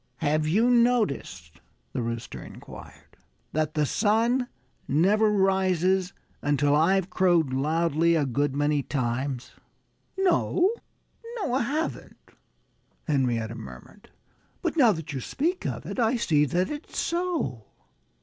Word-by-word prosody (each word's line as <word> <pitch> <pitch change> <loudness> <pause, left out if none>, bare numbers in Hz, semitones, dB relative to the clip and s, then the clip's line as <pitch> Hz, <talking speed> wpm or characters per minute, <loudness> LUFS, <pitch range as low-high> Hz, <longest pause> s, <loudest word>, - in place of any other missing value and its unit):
"Have 155 0 0
you 215 +9 +3
not 240 -1 +6 0.3
noticed," 90 - -9 0.3
the - - -2
Rooster 115 0 -5
inquired, - - -13 0.4
"that 155 0 -1
the 150 -1 +2
sun 230 - +1 0.4
never 200 +9 +3
rises 190 -2 +2 0.3
until 145 0 +2
I've 185 +4 +2
crowed 175 -7 +2
loudly 165 +4 +2
a 150 -3 +2
good 140 +2 -1
many 145 0 +1
times?" 130 -1 -3 0.7
"No! 380 0 +2 0.6
No 400 - -2
I 260 - +2
haven't," 300 +7 -3 0.9
Henrietta 120 -6 0
murmured. 115 - -12 0.5
"But 340 -2 -1
now 255 -8 +6
that 160 -4 -5
you 135 - -3
speak 340 - -2
of - - -5
it, - - -5
I 230 +1 +2
see 155 -11 +2
that 180 +7 0
it's 300 +1 -7
so." 335 - -2
165 Hz, 125 wpm, -26 LUFS, 140-220 Hz, 0.9 s, not